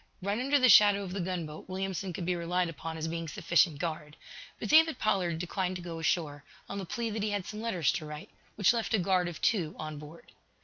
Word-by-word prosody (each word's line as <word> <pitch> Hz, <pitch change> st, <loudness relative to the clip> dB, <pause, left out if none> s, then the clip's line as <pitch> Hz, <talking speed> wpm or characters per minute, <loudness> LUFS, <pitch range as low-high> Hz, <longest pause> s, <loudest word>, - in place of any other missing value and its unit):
Right 200 Hz, +4 st, -2 dB
under 275 Hz, +3 st, +2 dB
the 255 Hz, -2 st, +5 dB
shadow 205 Hz, -2 st, +7 dB
of 185 Hz, -2 st, -6 dB
the 200 Hz, -, -3 dB
gunboat, 170 Hz, -3 st, -5 dB
Williamson 190 Hz, 0 st, -3 dB
could 170 Hz, +1 st, -5 dB
be 180 Hz, 0 st, 0 dB
relied 175 Hz, +1 st, -1 dB
upon 160 Hz, +1 st, -6 dB
as 160 Hz, 0 st, -3 dB
being 165 Hz, 0 st, -4 dB
sufficient 160 Hz, 0 st, +2 dB
guard. 155 Hz, -1 st, -5 dB, 0.4 s
But -, -, -4 dB
David 320 Hz, -2 st, +6 dB
Pollard 185 Hz, -7 st, 0 dB
declined 180 Hz, +2 st, -2 dB
to 180 Hz, -, -6 dB
go 165 Hz, -2 st, -6 dB
ashore, 155 Hz, -3 st, -1 dB, 0.2 s
on 200 Hz, -, -5 dB
the 195 Hz, -, -5 dB
plea 230 Hz, +3 st, -3 dB
that 215 Hz, 0 st, -3 dB
he 210 Hz, -, 0 dB
had 205 Hz, -3 st, -2 dB
some 215 Hz, 0 st, -6 dB
letters 185 Hz, -10 st, +1 dB
to 155 Hz, -, -4 dB
write, 150 Hz, 0 st, -9 dB, 0.2 s
which 205 Hz, +2 st, +4 dB
left 230 Hz, -1 st, 0 dB
a -, -, +3 dB
guard 185 Hz, -1 st, +1 dB
of 175 Hz, -, -6 dB
two 175 Hz, -8 st, +1 dB
on 155 Hz, -1 st, -6 dB
board. 150 Hz, +3 st, -13 dB
180 Hz, 230 wpm, -30 LUFS, 165-200 Hz, 0.4 s, shadow